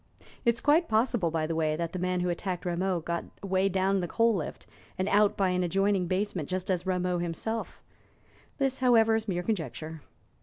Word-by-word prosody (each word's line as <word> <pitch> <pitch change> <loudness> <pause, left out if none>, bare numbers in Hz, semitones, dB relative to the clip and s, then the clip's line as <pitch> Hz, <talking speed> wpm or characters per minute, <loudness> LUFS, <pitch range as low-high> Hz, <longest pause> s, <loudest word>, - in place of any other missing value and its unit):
It 235 -1 +4
is 235 - -5
quite 320 +4 +4
possible, 220 -4 +2
by 160 -1 -1
the 165 - -2
way, 155 -1 +1
that 170 +1 -3
the 185 - -3
man 180 0 0
who 180 - 0
attacked 180 +1 -3
Rameau 180 0 0
got 170 +1 -3 0.2
away 190 0 +1
down 195 +1 +1
the 175 - -2
coal 230 +5 +3
lift 170 -7 -4 0.3
and 185 +1 -1
out 205 0 +3
by 195 -2 +2
an 180 0 +1
adjoining 195 +1 +1
basement, 185 -4 -2
just 185 +1 -2
as 180 -2 +1
did 185 - -13
Rameau 180 -1 0
himself; 175 +7 -4 0.7
this, 270 -2 0
however, 230 -3 +5
is 220 0 0
mere 180 -3 -1
conjecture. 160 - -4
185 Hz, 200 wpm, -29 LUFS, 175-210 Hz, 0.7 s, however